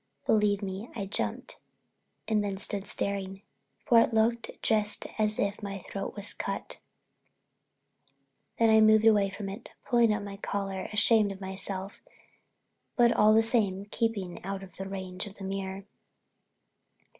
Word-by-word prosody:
Believe 210 Hz, -1 st, +2 dB
me 195 Hz, +4 st, -5 dB
I 200 Hz, -4 st, -3 dB
jumped 195 Hz, -, -3 dB, 0.7 s
and 215 Hz, -2 st, +2 dB
then 200 Hz, -1 st, -2 dB
stood 200 Hz, 0 st, -4 dB
staring, 195 Hz, -1 st, -3 dB, 0.4 s
for 235 Hz, -3 st, +6 dB
it 230 Hz, -, +1 dB
looked 230 Hz, +1 st, +2 dB
just 210 Hz, -2 st, +1 dB
as 215 Hz, 0 st, +1 dB
if 200 Hz, +1 st, -1 dB
my 200 Hz, -1 st, -4 dB
throat 195 Hz, 0 st, -4 dB
was 205 Hz, -1 st, -5 dB
cut! -, -, -5 dB, 1.8 s
Then 225 Hz, -1 st, +4 dB
I 220 Hz, 0 st, +6 dB
moved 215 Hz, 0 st, +6 dB
away 205 Hz, -3 st, +5 dB
from 200 Hz, +1 st, -6 dB
it, 200 Hz, +5 st, -8 dB, 0.2 s
pulling 235 Hz, -3 st, +4 dB
up 210 Hz, 0 st, -1 dB
my 200 Hz, -1 st, -7 dB
collar, 195 Hz, -2 st, -3 dB
ashamed 210 Hz, 0 st, +4 dB
of 195 Hz, -, -8 dB
myself 190 Hz, 0 st, -5 dB, 0.9 s
but 240 Hz, -1 st, +5 dB
all 215 Hz, +1 st, +5 dB
the 225 Hz, -, +5 dB
same 205 Hz, -5 st, +1 dB
keeping 205 Hz, -6 st, -2 dB
out 195 Hz, +1 st, -4 dB
of 185 Hz, -2 st, -14 dB
range 190 Hz, 0 st, -5 dB
of 200 Hz, -, -11 dB
the 195 Hz, -, -10 dB
mirror. 195 Hz, 0 st, -4 dB
200 Hz, 145 wpm, -29 LUFS, 195-220 Hz, 1.8 s, for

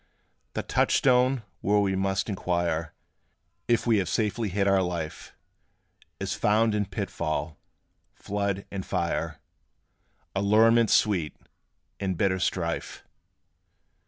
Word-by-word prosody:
The -, -, -2 dB
touchstone, 125 Hz, -1 st, +3 dB, 0.2 s
where 105 Hz, +2 st, +2 dB
we 95 Hz, -2 st, +1 dB
must 95 Hz, 0 st, 0 dB
inquire 85 Hz, -5 st, -1 dB, 0.7 s
If 120 Hz, -2 st, +2 dB
we 115 Hz, -2 st, +4 dB
have 95 Hz, -, -1 dB
safely 105 Hz, 0 st, 0 dB
hid 100 Hz, +2 st, 0 dB
our 100 Hz, -1 st, +4 dB
life, 85 Hz, -4 st, -4 dB, 0.8 s
Is -, -, -2 dB
found 110 Hz, +1 st, +2 dB
in 105 Hz, -2 st, 0 dB
pitfall, 80 Hz, -6 st, -3 dB, 0.6 s
flood, 100 Hz, -1 st, -2 dB
and 95 Hz, -1 st, -4 dB
fire, -, -, -2 dB, 1.0 s
Allurements 110 Hz, +3 st, +4 dB
sweet, 90 Hz, -8 st, +1 dB, 0.6 s
and 95 Hz, -3 st, -2 dB
bitter 95 Hz, 0 st, +1 dB
strife. 85 Hz, -2 st, -2 dB
100 Hz, 105 wpm, -27 LUFS, 90-105 Hz, 1.0 s, we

